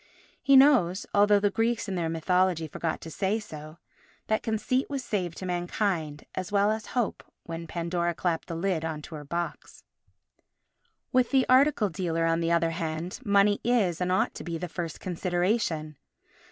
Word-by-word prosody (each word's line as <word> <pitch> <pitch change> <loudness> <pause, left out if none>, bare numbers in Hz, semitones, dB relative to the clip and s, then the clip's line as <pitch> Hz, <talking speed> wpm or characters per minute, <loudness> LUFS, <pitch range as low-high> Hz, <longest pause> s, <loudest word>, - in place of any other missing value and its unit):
He 275 -1 +5
knows, 255 -10 +5
although 205 0 +5
the 205 0 +1
Greeks 225 +1 0
in 195 - -3
their 170 -3 -1
mythology 170 0 +1
forgot 160 +2 -3
to 160 - -8
say 195 +8 0
so, 155 -6 -10 0.5
that 220 - 0
Conceit 230 +4 -1
was 275 -2 -3
saved 180 -7 -2
to 185 - -6
mankind 175 -4 -2
as 185 +2 -4
well 205 +1 +3
as 220 0 -3
Hope 240 -4 -1 0.2
when 165 0 -6
Pandora 170 0 -2
clapped 170 -2 -1
the 165 - -4
lid 170 -1 -1
on 155 -2 -4
to - - -10
her 150 -1 -6
box. 170 +4 -5 1.3
With 255 -2 +3
the 265 -2 +3
article 255 -5 +4
dealer, 165 -2 -1
on 165 0 +2
the 165 0 0
other 170 -1 +2
hand, 165 +3 -4
money 205 -1 +3
is, 205 -8 +1
and 180 0 0
ought 185 - +1
to - - -8
be, 170 -1 -4
the 180 +2 -4
first 170 -1 -5
consideration. 175 - -1
180 Hz, 175 wpm, -27 LUFS, 165-210 Hz, 1.3 s, He